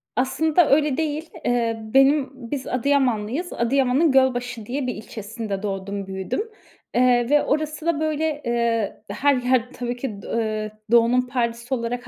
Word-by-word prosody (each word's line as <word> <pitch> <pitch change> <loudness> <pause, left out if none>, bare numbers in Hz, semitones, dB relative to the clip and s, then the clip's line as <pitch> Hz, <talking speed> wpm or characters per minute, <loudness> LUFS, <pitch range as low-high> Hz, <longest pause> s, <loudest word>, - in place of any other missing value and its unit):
Aslında 310 +6 +2
öyle 290 -1 +3
değil. 315 0 -2 0.2
Eee, 230 -2 +1
benim, 270 +1 +5 0.2
biz 280 -3 -3
Adıyamanlıyız. 260 +3 0
Adıyaman'ın 270 +5 +2
Gölbaşı 250 -4 +1
diye 255 +3 -3
bir 250 - -2
ilçesinde 215 -2 -6
doğdum, 195 0 -4
büyüdüm. 190 - -3 0.5
Eee, 245 -1 +3
ve 295 0 +4
orası 305 +1 -2
da, 335 -3 +1
böyle, 310 -1 -1
eee, 235 -3 0
her 285 0 +2
yer 250 -1 +1
tabii 245 0 -3
ki 240 -5 -5
d - - -10
eee, 215 -2 -2 0.2
Doğu'nun 235 +1 +5
Paris'i 240 -1 -2
olarak 245 0 -3
250 Hz, 145 wpm, -23 LUFS, 230-285 Hz, 0.5 s, benim